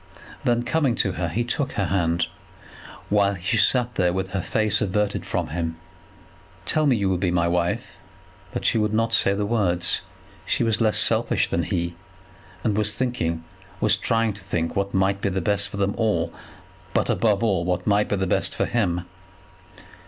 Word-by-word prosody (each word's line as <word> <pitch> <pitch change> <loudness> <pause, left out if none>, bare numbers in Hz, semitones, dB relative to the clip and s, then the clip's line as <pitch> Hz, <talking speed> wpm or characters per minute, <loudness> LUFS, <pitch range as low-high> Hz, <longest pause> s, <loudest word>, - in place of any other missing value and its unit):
Then, 120 0 +2
coming 140 -3 +1
to 95 - +1
her, 90 -1 -2
he 115 +9 -1
took 135 +3 -2
her 100 - 0
hand, 85 -2 +1 0.8
while 100 -1 +3
she 95 +6 -1
sat 125 +2 +3 0.2
with 95 0 -2
her 95 -1 -1
face 105 +2 +1
averted 105 0 -1
from - - -2
him. 80 0 -3 0.9
"Tell 155 +6 +2
me 130 - +4
that 105 - -2
you 100 - +2
will 95 -2 +1
be 90 -1 +1
my 85 -1 +2
wife." 85 0 -1 0.5
But - - -4
she 115 - +3
would 105 0 0
not 115 +1 +1
say 100 -3 +4
the 105 +1 -1
words. 100 -6 +1 0.4
She - - 0
was 115 0 +1
less 110 -2 +3
selfish - - +2
than - - 0
he, 85 0 -2 0.7
and 105 -3 +1
was 105 0 +2
thinking, 85 -11 -1 0.4
was 110 - +4
trying 115 -2 0
to 100 0 -13
think 85 -4 -2
what 100 0 -1
might 95 +1 +1
be 100 - +1
best 100 +2 0
for 100 - -7
them 100 0 +1
all, 85 -7 +1 0.6
but, - - +2
above 110 -1 +2
all, 95 -7 +1
what 90 0 -1
might 105 0 +2
be - - +1
best 95 -2 -1
for - - +1
him. 90 -7 0
100 Hz, 180 wpm, -24 LUFS, 90-110 Hz, 0.9 s, me